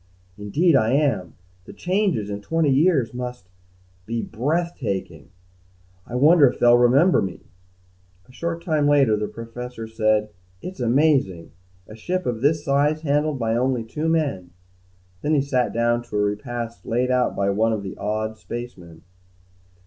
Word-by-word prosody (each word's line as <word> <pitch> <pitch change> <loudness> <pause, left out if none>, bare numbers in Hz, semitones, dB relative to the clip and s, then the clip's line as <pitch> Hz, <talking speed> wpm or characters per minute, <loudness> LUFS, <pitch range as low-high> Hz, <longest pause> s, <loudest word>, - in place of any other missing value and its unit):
"Indeed, 145 - +1
I 110 +1 +3
am. 115 - 0 0.3
The - - -11
changes, 180 - -1
in 100 0 -5
twenty 160 +5 +1
years 140 -4 +2
must 125 -6 -7 0.6
be 115 0 -2
breathtaking. 135 - -3 0.8
I 120 - -7
wonder 145 +2 +6
if - - -7
they'll 120 0 +5
remember 135 +10 +4
me?" 95 -2 -5 0.9
A - - -18
short 170 +5 -4
time 155 -4 +1
later, 140 -6 +4
the 105 0 -2
Professor 115 0 -8
said, 110 -1 0 0.3
"It's 180 - -8
amazing. 125 - +1 0.4
A 110 - -11
ship 180 +11 -3
of 115 -2 -2
this 150 +2 +1
size 145 +3 +1
handled 150 0 0
by 115 -2 -1
only 125 -1 0
two 150 +8 -3
men." 140 - -1 0.7
Then 155 +1 +1
he 140 - +3
sat 130 -3 0
down 120 +1 +1
to 110 - -9
a - - +2
repast 115 +3 -4
laid 125 +2 0
out 125 -1 +1
by 100 0 +1
one 110 +3 +1
of 105 -2 -2
the 95 - -6
awed 110 +1 -3
spacemen. 110 -9 -9
125 Hz, 155 wpm, -22 LUFS, 110-150 Hz, 0.9 s, wonder